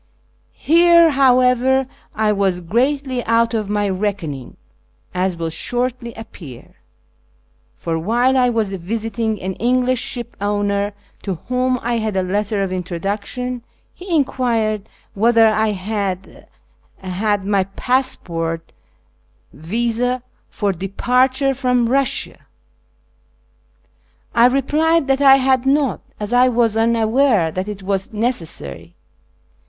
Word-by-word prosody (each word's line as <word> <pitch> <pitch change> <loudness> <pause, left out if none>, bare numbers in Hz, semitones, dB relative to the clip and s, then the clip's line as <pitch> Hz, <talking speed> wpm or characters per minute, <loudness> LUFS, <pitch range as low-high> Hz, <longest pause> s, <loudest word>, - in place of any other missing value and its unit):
Here, 340 0 +5
however, 260 -1 +3 0.3
I 215 0 +2
was 195 -3 0
greatly 255 - 0
out 230 +1 +2
of 215 -3 -2
my 205 0 0
reckoning, 185 -9 -3 0.6
as 180 -1 -1
will 165 -1 -3
shortly 245 +6 -3
appear; 160 - -12 1.0
for 165 -1 -2
while 240 +9 +2
I 250 -1 +4
was 225 -4 0
visiting 220 +3 -3
an 190 +1 -4
English 250 +1 +1
ship 240 -1 -6
owner, 205 0 0 0.3
to 195 -3 -3
whom 255 0 +1
I 235 0 0
had 215 -3 -2
a 190 - +1
letter 205 +2 -1
of 190 -1 -3
introduction, 200 +8 -4 0.3
he 370 +2 -11
enc[uired 225 -6 -1 0.3
w^hether 225 +1 +4
I 220 0 +1
had 195 -1 -4 0.5
had 195 +2 -1
my 200 -2 +1
passport 175 -8 -2 0.8
visd 235 - -1 0.3
for 205 -2 -1
departure 250 - +1
from 250 -2 +1
Eussia. 270 +1 0 2.0
I 235 +1 +6
re 270 +2 +1
plied 320 +3 +2
that 270 +1 +1
I 270 -1 +8
had 260 -1 +2
not, 275 -1 +1 0.2
as 210 +2 -3
I 250 +1 +5
was 230 -3 +1
unaware 225 - +2
that 185 +4 -4
it 205 -2 -7
was 195 0 -2
necessary. 155 - -3
225 Hz, 115 wpm, -19 LUFS, 195-250 Hz, 2.0 s, I